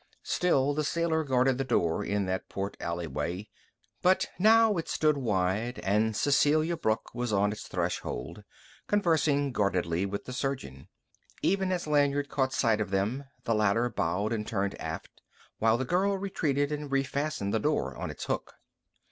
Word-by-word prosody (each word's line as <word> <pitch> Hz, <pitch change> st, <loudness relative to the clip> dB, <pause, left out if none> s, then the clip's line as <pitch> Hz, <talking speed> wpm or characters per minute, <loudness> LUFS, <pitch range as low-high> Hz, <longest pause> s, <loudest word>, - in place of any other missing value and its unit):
Still 145 Hz, -6 st, +2 dB
the 155 Hz, +1 st, 0 dB
sailor 160 Hz, +1 st, 0 dB
guarded 130 Hz, -2 st, +2 dB
the -, -, +1 dB
door 85 Hz, -10 st, +1 dB
in 100 Hz, -1 st, 0 dB
that 95 Hz, 0 st, -3 dB
port 100 Hz, +1 st, -4 dB
alleyway; 85 Hz, +3 st, -3 dB, 0.5 s
but 185 Hz, +1 st, +3 dB
now 220 Hz, +1 st, +6 dB
it 165 Hz, -, -3 dB
stood 155 Hz, -1 st, +2 dB
wide, 110 Hz, -1 st, 0 dB
and 105 Hz, +3 st, +2 dB
Cecelia 155 Hz, +4 st, +3 dB
Brooke 110 Hz, -9 st, -1 dB
was 120 Hz, -1 st, -2 dB
on 100 Hz, 0 st, +2 dB
its 105 Hz, -, -7 dB
threshold, 85 Hz, +12 st, -3 dB, 0.4 s
conversing 160 Hz, -8 st, +2 dB
guardedly 95 Hz, -4 st, 0 dB
with 100 Hz, +1 st, -5 dB
the 125 Hz, -, -6 dB
surgeon. 125 Hz, -, -4 dB, 0.6 s
Even 190 Hz, -1 st, +2 dB
as 180 Hz, -2 st, -1 dB
Lanyard 145 Hz, -1 st, +2 dB
caught 135 Hz, -1 st, 0 dB
sight 115 Hz, -4 st, +2 dB
of 100 Hz, -, -2 dB
them, 105 Hz, +8 st, -1 dB, 0.2 s
the 115 Hz, -, +1 dB
latter 110 Hz, +3 st, +2 dB
bowed 90 Hz, +6 st, -1 dB
and 105 Hz, -2 st, -3 dB
turned 100 Hz, -2 st, -1 dB
aft, -, -, -6 dB, 0.4 s
while 110 Hz, +1 st, +3 dB
the 130 Hz, -, -2 dB
girl 195 Hz, +6 st, +1 dB
retreated 150 Hz, -7 st, -1 dB
and 150 Hz, -1 st, -4 dB
refastened 135 Hz, -5 st, -1 dB
the 110 Hz, -, +2 dB
door -, -, 0 dB
on -, -, -4 dB
its -, -, -7 dB
hook. -, -, -3 dB
125 Hz, 160 wpm, -29 LUFS, 100-150 Hz, 0.6 s, now